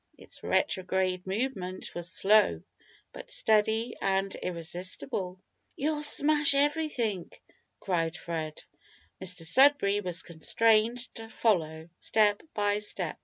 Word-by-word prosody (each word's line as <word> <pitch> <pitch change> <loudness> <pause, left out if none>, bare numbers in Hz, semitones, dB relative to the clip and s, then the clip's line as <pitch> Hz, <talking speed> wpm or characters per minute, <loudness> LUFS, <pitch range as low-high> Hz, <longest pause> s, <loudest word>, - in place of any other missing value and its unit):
Its - - -13
retrograde 185 -5 -1
movement 190 -3 -4
was 175 0 -3
slow, 195 - +3 0.5
but - - -11
steady 220 +2 +1
and 195 0 0
irresistible. 180 +2 -4 0.4
"You'll 300 +1 -2
smash 295 -1 +5
everything!" 280 - -1 0.5
cried 170 -2 -2
Fred. 160 -2 -6 0.6
Mr 180 -2 0
Sudberry 205 - +4
was 180 0 -2
constrained 220 +7 +1 0.2
to 225 -1 -10
follow, 160 -9 -1
step 210 -2 +2
by 205 0 +1
step. 190 -5 -4
195 Hz, 105 wpm, -28 LUFS, 180-225 Hz, 0.6 s, smash